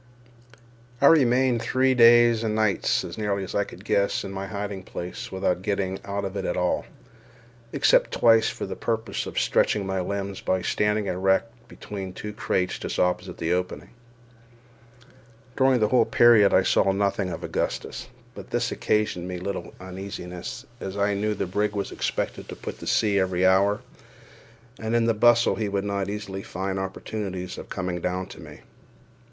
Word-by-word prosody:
I 140 - +3
remained 130 -5 +4
three 130 +2 +2
days 120 -1 +6
and 110 -1 -1
nights 110 -3 +1
(as - - -7
nearly 100 -2 -1
as 95 - -7
I 100 - +2
could 100 0 -12
guess) 100 -2 +1
in 95 - -6
my 95 0 -5
hiding 100 -2 -4
place 90 -1 -7
without 95 -1 0
getting 95 -1 -2
out 100 0 -3
of 95 +1 -5
it 100 - -2
at 90 - -2
all, 90 0 0 0.9
except - - +3
twice 115 -1 +4
for - - -5
the - - -5
purpose 115 -1 -2
of - - -8
stretching 105 -2 +2
my 95 -1 -1
limbs 100 +1 -4
by 95 0 0
standing 105 0 +1
erect 95 +4 +1 0.2
between 95 -4 -7
two 105 +2 -7
crates 90 -3 -1
just - - -4
opposite 90 +1 0
the 85 +1 0
opening. 90 0 -3 1.6
During 130 -2 +3
the 105 -1 +2
whole 120 -2 +4
period 115 -4 +6
I 95 - +4
saw 95 - +3
nothing 100 -1 0
of - - -6
Augustus; - - -3 0.3
but - - -10
this - - -1
occasioned 105 -5 0
me 90 -1 -4
little 90 -1 -5
uneasiness, 90 -1 -7
as 95 +1 -6
I 100 0 +2
knew 105 +2 -1
the 100 - -2
brig 105 +3 -1
was 100 -1 -3
expected - - -3
to - - -6
put - - -7
to - - -8
sea 105 -2 +2
every 95 -1 +1
hour, 100 +3 +3 1.0
and 110 +1 -2
in 115 -1 +3
the 115 - +3
bustle 120 +2 +4
he 110 -2 -1
would 100 0 -1
not 100 -1 -2
easily 100 -2 -5
find 95 0 -4
opportunities 95 -1 -5
of - - -10
coming 90 -2 -3
down 90 +1 -2
to - - -11
me. - - -12
100 Hz, 175 wpm, -25 LUFS, 95-110 Hz, 1.6 s, days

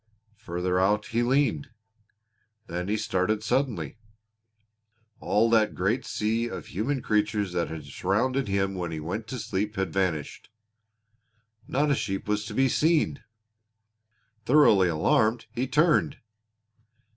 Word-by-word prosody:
Further 90 -3 -2
out 105 +3 +2
he 115 +1 -1
leaned. 125 - +1 1.0
Then 90 -1 -4
he 105 +2 0
started 105 +1 -1
suddenly. 110 - -1 1.2
All 110 +3 +2
that 110 -2 +3
great 110 +8 -1
sea 115 +2 -1
of - - -7
human 125 +7 -2
creatures 105 -3 0
that 85 -1 0
had 80 -2 -7
surrounded 115 - -1
him 95 0 0
when 90 -2 -4
he 80 - -4
went 95 +8 -5
to 130 - -5
sleep 105 -1 -3
had 95 -4 -2
vanished! 90 -6 -2 1.2
Not 145 +2 +1
a - - +3
sheep 95 -5 -3
was 105 0 -1
to - - -7
be 135 0 +3
seen. 155 +1 +1 1.2
Thoroughly 115 -10 +5
alarmed, 110 - +1
he 125 +3 -2
turned. 155 0 +2
105 Hz, 130 wpm, -26 LUFS, 95-125 Hz, 1.2 s, Thoroughly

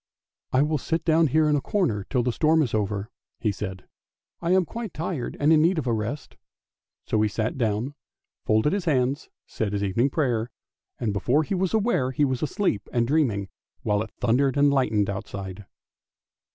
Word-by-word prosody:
" - - -68
I 130 +2 +4
will 150 0 0
sit 165 +4 -2
down 160 0 +4
here 155 +3 +3
in 150 - +3
a 145 - +1
corner 130 - -1
till 125 -3 +1
the 125 - +1
storm 155 +5 +3
is 125 - -3
over," 105 +1 -1 0.3
he 105 - +1
said; 95 -2 -6 0.3
" - - -57
I 170 - -2
am 185 0 +4
quite 230 0 -6
tired 160 -5 -3
and 150 +2 +4
in 155 - +5
need 170 +3 +3
of 155 - -1
a 120 - +1
rest! 115 +7 -4 0.3
" - - -62
so 110 - +1
he 110 - +2
sat 110 +1 -2
down, 115 +2 -1 0.5
folded 110 - +2
his 200 -3 -1
hand, 145 -6 +3
and 140 +3 -5 0.2
said 105 -2 -3
his 100 0 -1
evening 115 +7 +1
prayer; 125 -6 0 0.5
and 110 -4 -1
before 125 +10 +2
he 175 - -3
was 190 +2 0
aware 210 - +1
he 140 +3 +1
was 130 -2 -1
asleep 155 - -1
and 120 -1 +2
dreaming, 120 -10 +1 0.3
while 105 -1 +1
it 110 - -4
thundered 130 +3 +2
and 145 0 +5
lightened 110 -7 +2
outside. 100 -1 -6
130 Hz, 205 wpm, -25 LUFS, 110-155 Hz, 0.5 s, in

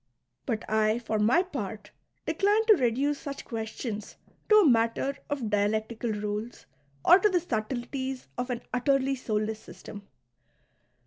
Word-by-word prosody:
But 220 -3 -2
I 215 +1 +2
for 225 -2 -2
my 240 - +4
part 220 - -6 0.3
decline 415 +3 +2
to 440 - +8
reduce 275 - +1
such 280 -1 -7
questions 220 -2 -5 0.3
to 425 - +7
a 415 -6 +7
matter 230 +3 +2
of 265 -7 -2
dialectical 220 +3 0
rules 210 +2 -4 0.4
or 360 - +8
to 425 - +4
the 365 -3 +2
subtleties 260 0 -3
of 245 +1 -3
an 245 -1 -3
utterly 270 +2 +2
soulless 220 -4 -2
system. 205 -2 -11
240 Hz, 135 wpm, -28 LUFS, 215-275 Hz, 0.4 s, to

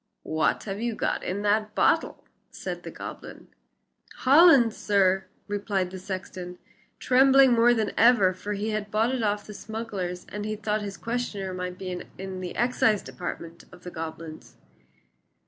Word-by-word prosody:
"What 155 0 0
have 200 0 -5
you 235 -1 -1
got - - -1
in 200 +3 -3
that 210 +1 +1
bottle?" - - +1 0.3
said - - -6
the - - -8
goblin. - - -9 0.7
"Hollands, 275 -5 +6
sir," 195 -2 +2 0.2
replied 200 -3 -2
the 190 - -7
sexton, 185 -1 -6 0.4
trembling 265 0 +5
more 240 +1 +5
than 215 -3 0
ever, 225 -6 +5
for 205 +3 -5
he 210 +2 -2
had 210 -1 -3
bought 220 +4 +1
it 255 - -1
of 205 -1 -1
the 210 - -9
smugglers, 200 -5 -5
and 210 0 -5
he 215 0 -3
thought 210 0 -2
his 200 -1 -6
questioner 225 -5 -3
might 180 0 -5
be 185 -2 -5 0.2
in 190 -1 -6
the 180 - -6
excise 225 -3 +2
department 170 -1 -7
of 180 - -15
the 180 - -7
goblins. 160 -1 -8
205 Hz, 160 wpm, -26 LUFS, 185-225 Hz, 0.7 s, Hollands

